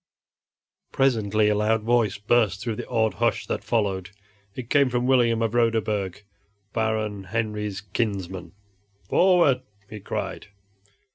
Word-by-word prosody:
Presently 110 -5 +2
a 105 - +3
loud 105 +1 +1
voice 115 -3 +2
burst 105 -1 +2
through 115 0 -3
the - - -6
awed 110 -3 +1
hush 120 0 0
that - - -3
followed. 100 -5 -1 0.5
It 125 -2 -7
came 140 -3 +4
from 125 0 -1
William 120 -3 +3
of 115 -1 -1
Roderburg, 110 -5 0 0.5
Baron 110 -3 -1
Henry's 105 -2 -3
kinsman. 95 -4 -3 0.5
"Forward!" 175 -8 +4 0.3
he 105 +1 -8
cried. 100 - -5
110 Hz, 125 wpm, -24 LUFS, 105-120 Hz, 0.5 s, came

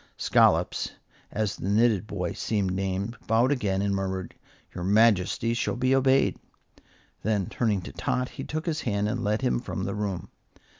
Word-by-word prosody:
Scollops, - - +3 0.4
as 110 -2 -1
the 95 - -3
knitted 110 -1 +3
boy 90 -5 -3
seemed 100 -4 -1
named, 95 +4 -2
bowed 115 +4 +3
again 100 -8 0
and 100 -1 +1
murmured, 95 -2 -3 0.4
"Your 90 - -5
Majesty 110 +2 +3
shall 120 - -1
be 130 +1 +2
obeyed." 135 0 +3 0.8
Then, 105 -2 0
turning 105 -4 0
to - - -7
Tot, 125 0 -1
he 135 - -7
took 155 +3 -4
his 160 -2 -1
hand 100 -3 0
and 120 +2 -2
led 105 +1 0
him 60 -1 +2
from - - -4
the - - -2
room. 100 -5 -3
105 Hz, 165 wpm, -27 LUFS, 95-120 Hz, 0.8 s, Scollops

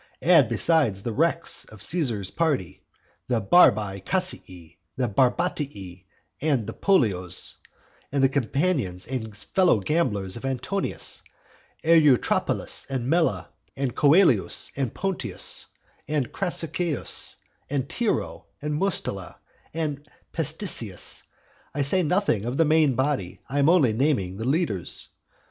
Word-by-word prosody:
Add, 160 -9 +5
besides 115 - +2
the 115 - -3
wrecks 165 +5 +1
of 110 -2 -10
Caesar's 115 - -1
party, 95 - -1 0.5
the 125 -3 +1
Barbae 105 - +4
Cassii, 90 - -3 0.2
the 130 -1 0
Barbatii, 120 - -1 0.4
the 135 -8 0
Pollios; 100 - +1 0.6
add 140 -1 +1
the - - +7
companions 135 - -1
and 110 -5 -5
fellow 120 - +2
gamblers 100 - -1
of 115 - -9
Antonius, 135 +9 -1 0.6
Eutrapelus, 155 -6 +2
and 130 -3 -3
Mela, 170 -1 +1 0.2
and 135 -3 -2
Coelius, 145 - +3
and 135 -5 -2
Pontius, 195 -1 -2 0.4
and 145 -5 -1
Crassicius, 175 -4 -1 0.3
and 135 -1 -1
Tiro, 220 +7 -2
and 150 0 -3
Mustela, 150 - -2 0.4
and 150 -3 -4 0.3
Petissius; - - -1 0.5
I 145 - +1
say 185 +7 +2
nothing 180 - +1
of 125 +3 -3
the 165 - +4
main 155 -3 +3
body, 130 -9 -1
I 140 +3 -2
am 140 +2 +4
only 150 -11 +4
naming 110 -8 0
the 110 - -4
leaders. 135 - -1
135 Hz, 120 wpm, -25 LUFS, 110-165 Hz, 0.6 s, the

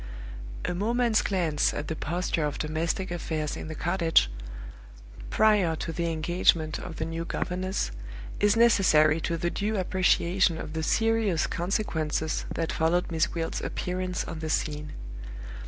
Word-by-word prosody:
A - - -1
moment's 230 +4 +2
glance 170 -7 +1
at 145 - -4
the 160 - -2
posture 170 +1 -1
of 145 -1 -2
domestic 165 +4 -2
affairs 160 -3 -2
in - - -6
the 160 - -6
cottage, 165 - +2 1.0
prior 210 -6 +3
to 165 - -4
the 170 0 -1
engagement 160 -1 +2
of 160 - -7
the 160 - -3
new 165 +1 -3
governess, 185 - -2 0.5
is 205 +1 +4
necessary 165 -9 +5
to 165 - -1
the 175 +1 -1
due 210 +1 -1
appreciation 185 -1 +2
of 155 - -6
the 160 - -2
serious 225 -1 +2
consequences 160 -4 -1
that 165 -1 -2
followed 170 +2 +1
Miss 165 0 +2
Gwilt's 165 -1 -3
appearance 180 0 -3
on 165 -2 -6
the 160 0 -4
scene. 150 -1 -2
170 Hz, 145 wpm, -27 LUFS, 160-185 Hz, 1.0 s, necessary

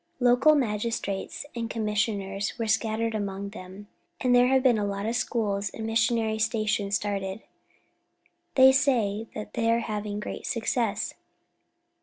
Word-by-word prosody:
Local 250 +5 +5
magistrates 210 -4 -2
and 230 -1 -3
commissioners 210 -3 -1
are 230 - 0
scattered 220 +1 0
about 215 - -1
among 200 0 -4
them, 195 0 -10 0.3
and 250 -1 +2
there 245 0 +6
have 265 0 +3
been 245 -5 +4
a - - 0
lot 200 0 -3
of 230 +2 -1
schools 205 -5 -1
and 220 - -7
missionary 225 -1 +1
stations 215 -2 0
started. 195 0 -3 1.1
They 265 0 +8
say 230 -6 +1
that 210 - -7
they 230 0 0
are 230 +1 +3
having 210 -2 -4
great - - -6
success. 230 -3 -1
220 Hz, 145 wpm, -27 LUFS, 205-235 Hz, 1.1 s, They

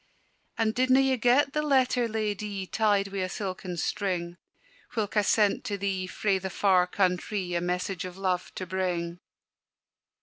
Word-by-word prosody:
"And 220 -1 +1
didna 255 +2 +4
ye 270 -1 +3
get 255 +4 +3
the 300 - +1
letter, 260 -4 +2
Ladye, 210 -3 -3
Tied 205 -1 +1
wi' 195 0 -4
a 185 0 -1
silken 185 -2 -5
string, 175 -2 -2 0.6
Whilk 215 -2 -2
I 210 - +5
sent 205 0 +2
to 205 - -2
thee 190 -1 -2
frae 195 +1 0
the 190 +1 -4
far 185 -1 +3
countrie, 180 0 -1
A 170 - 0
message 180 +1 -2
of 185 0 -7
love 185 -2 -1
to 185 - -4
bring?" 175 -2 -2
195 Hz, 160 wpm, -28 LUFS, 180-220 Hz, 0.6 s, I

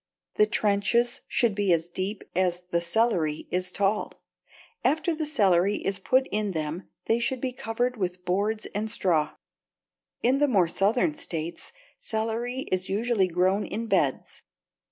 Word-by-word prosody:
The 210 - +4
trenches 215 +4 +1
should 235 -4 +2
be 200 -2 +1
as 165 -1 +2
deep 190 +4 -4
as 180 -1 +1
the 170 - +2
celery 170 -5 0
is 180 0 -1
tall, 205 +2 0 0.7
and 270 - +4
after 320 +2 -1
the 310 -1 -3
celery 200 - +3
is 195 -1 -2
put 260 +6 +2
in 210 -2 0
them 160 +3 -4 0.2
they 230 - +2
should 255 +2 -1
be 255 0 -2
covered 245 +1 -2
with 180 -2 -3
boards 205 +4 0
and 215 +2 -2
straw. 165 -8 +1 0.9
In 260 +3 +3
the 290 - +4
more 195 -9 +3
southern 220 - +2
states, 170 - -5 0.3
celery 230 +3 -2
is 185 0 0
usually 210 -1 +2
grown 185 +4 +2
in 230 +2 -4
beds. 180 - 0
205 Hz, 155 wpm, -27 LUFS, 180-235 Hz, 0.9 s, The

